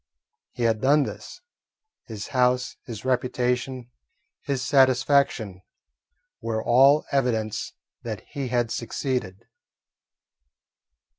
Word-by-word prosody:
He 120 - -4
had 110 -2 +1
done 145 +2 +4
this. - - -8 0.7
His 110 -3 -7
house, 125 -1 +1
his 115 0 -7
reputation, 125 0 -1 0.5
his 135 -2 -2
satisfaction, 130 -7 +2 0.8
were 110 -1 -3
all 135 +5 +5
evidences 115 -6 -1 0.3
that - - -5
he 140 -2 -4
had 120 -1 0
succeeded. 120 -5 -3
125 Hz, 90 wpm, -25 LUFS, 115-135 Hz, 0.8 s, all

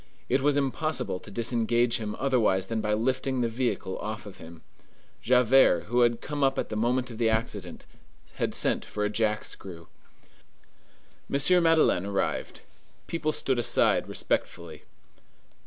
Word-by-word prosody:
It 135 - +2
was 145 +1 +2
impossible 140 -6 -1
to - - -12
disengage 120 +2 +1
him 105 -2 -4
otherwise 115 -8 +1
than 115 -1 -3
by 105 0 0
lifting 130 +3 -1
the 120 - +1
vehicle 115 -5 -2
off 105 0 -5
of 100 -2 -11
him. 80 -1 -13 0.6
Javert, 125 -6 +4
who 120 +1 +1
had 120 -1 +2
come 145 -1 -3
up 135 0 +2
at - - -2
the - - -4
moment 125 +3 0
of 115 - -9
the 115 -1 +3
accident, 105 -5 -3 0.5
had - - -1
sent - - 0
for 105 0 -3
a 105 - -1
jack 105 -1 0
screw. 85 -4 -7 1.4
M. 175 +6 +3
Madeleine 160 - +3
arrived. 100 -1 -2 0.4
People 165 -2 -2
stood 130 -4 -1
aside 120 - +2
respectfully. - - -3
120 Hz, 150 wpm, -27 LUFS, 105-130 Hz, 1.4 s, Javert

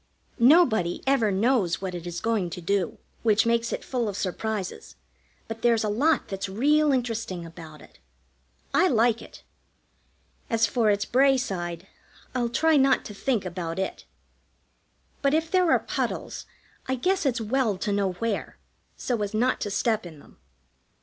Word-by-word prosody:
Nobody 235 - +4
ever 265 -6 +2
knows 200 -3 +1
what 190 -1 -4
it 175 -1 -6
is 175 0 -5
going 220 -6 0
to 170 - -7
do, 185 +1 -1 0.2
which 220 -1 +3
makes 230 0 +1
it - - -3
full 240 -4 -1
of 200 - -5
surprises, 200 +1 -4 0.5
but 225 0 -7
there's 230 -2 +3
a 215 - 0
lot 280 +8 +2
that's 195 0 -4
real 295 +9 +3
interesting 230 -9 -2
about 160 -2 -11
it. - - -19 0.7
I - - +4
like 235 -4 +2
it. - - -13 1.1
As 225 -2 +3
for 225 +1 +1
its 205 0 +1
Bray 270 +2 +4
side, 175 -7 -4 0.5
I'll 245 -2 0
try 320 +5 +3
not 270 0 +3
to 210 - -7
think 225 -1 -1
about 170 -2 -4
it; 190 - -4 1.2
but 280 +1 +2
if 320 +1 -1
there 365 -2 +3
are - - +6
puddles, - - -4 0.4
I 260 - 0
guess 365 +9 0
it's 260 -5 0
well 225 -2 0
to 205 - -2
know 200 -2 0
where, 215 +3 -3 0.4
so 240 -4 -2
as 205 +1 -3
not 245 +4 +1
to 205 - -2
step 215 -1 0
in 160 -3 -12
them. - - -19
225 Hz, 165 wpm, -26 LUFS, 190-255 Hz, 1.2 s, are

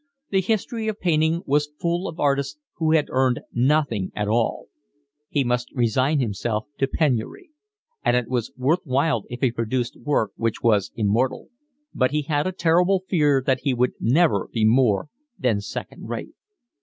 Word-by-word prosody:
The 195 -1 +3
history 220 +3 -1
of 215 -1 -2
painting 160 0 +1
was 150 +1 +1
full 175 +3 -1
of 165 - -8
artists 140 - 0 0.2
who 160 -1 +2
had 155 -2 +3
earned 130 -1 +2
nothing 125 -6 +1
at 105 -1 -1
all. 115 +2 0 0.6
He 145 - +1
must 125 0 -1
resign 130 +5 +2
himself 110 -1 -2
to 135 - +2
penury; 150 - -1 0.5
and 120 - +3
it 125 -2 -1
was 120 -3 -2
worth 145 +7 +2
while 135 - 0
if 120 - -7
he 130 -3 +3
produced 115 +1 -2
work 130 -8 0
which 115 -1 -2
was 105 -4 +2
immortal; 115 +5 0 0.4
but 130 -1 +2
he 150 +1 -1
had 145 +2 0
a - - -1
terrible 180 +2 +2
fear 145 -6 +3
that 130 - +2
he 135 -3 0
would 125 +1 +1
never 130 - +2
be 110 -2 +1
more 115 -1 +3 0.3
than 115 -6 +1
second 105 - -7
rate. - - -5
130 Hz, 170 wpm, -23 LUFS, 120-155 Hz, 0.6 s, The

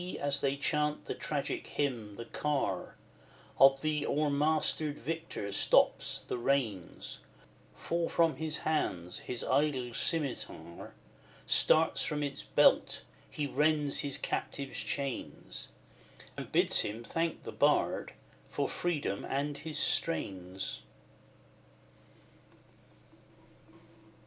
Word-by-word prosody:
as 140 0 0
they 140 0 +1
chant 150 +1 0
the - - -3
tragic - - -3
hymn, 120 -8 -2
the 115 - -7
car 150 +1 -1 0.6
Of 135 0 +7
the 155 -1 +1
o'ermastered 150 +1 +1
victor 160 -10 -4
stops, - - +3
the - - -4
reins 120 -9 -1 0.6
Fall 170 0 -1
from 165 -5 +2
his 155 +1 0
hands 90 - -1
his 125 - -3
idle 130 -3 +1
scimitar 125 - -2 0.5
Starts 160 +1 +4
from 150 -1 -1
its 140 -1 -3
belt - - +3 0.3
he 150 - -2
rends 150 +1 +2
his 140 -2 +1
captive's 140 -1 -3
chains, 140 -3 -4 0.7
And - - -7
bids - - +4
him 110 +3 -1
thank 165 +6 -2
the - - -6
bard - - +2 0.4
for - - -1
freedom 155 - -2
and 145 +2 -2
his 155 +1 -4
strains. 95 - -1
145 Hz, 105 wpm, -32 LUFS, 125-155 Hz, 0.7 s, Of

